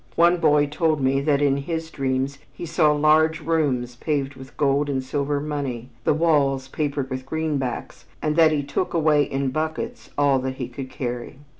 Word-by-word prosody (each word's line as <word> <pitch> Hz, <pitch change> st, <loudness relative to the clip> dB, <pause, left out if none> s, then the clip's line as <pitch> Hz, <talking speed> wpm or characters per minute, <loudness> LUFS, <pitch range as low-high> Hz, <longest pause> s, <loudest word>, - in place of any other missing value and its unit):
One 170 Hz, +1 st, +5 dB
boy 150 Hz, -3 st, +4 dB
told 155 Hz, +1 st, 0 dB
me 135 Hz, +1 st, +2 dB
that 145 Hz, 0 st, +2 dB
in 140 Hz, -1 st, +3 dB
his 160 Hz, +3 st, -4 dB
dreams 135 Hz, 0 st, -1 dB
he -, -, -7 dB
saw 155 Hz, -2 st, +3 dB
large 155 Hz, +1 st, +3 dB
rooms 135 Hz, -7 st, 0 dB
paved 140 Hz, -1 st, -1 dB
with 130 Hz, 0 st, -13 dB
gold 145 Hz, 0 st, +2 dB
and 135 Hz, -2 st, -1 dB
silver 140 Hz, +2 st, -1 dB
money, 140 Hz, -5 st, -4 dB, 0.2 s
the -, -, +4 dB
walls 140 Hz, -5 st, +2 dB
papered 140 Hz, -1 st, -2 dB
with 130 Hz, 0 st, -3 dB
greenbacks, 145 Hz, -3 st, -3 dB
and 150 Hz, 0 st, -1 dB
that 160 Hz, -1 st, +6 dB
he 145 Hz, -2 st, 0 dB
took 145 Hz, +6 st, -2 dB
away 155 Hz, -2 st, +4 dB
in 135 Hz, -1 st, -1 dB
buckets 160 Hz, -, -4 dB
all 140 Hz, -2 st, +3 dB
that 130 Hz, 0 st, -3 dB
he 125 Hz, -2 st, -5 dB
could 130 Hz, +1 st, -7 dB
carry. 120 Hz, -1 st, -5 dB
145 Hz, 180 wpm, -23 LUFS, 135-155 Hz, 0.2 s, that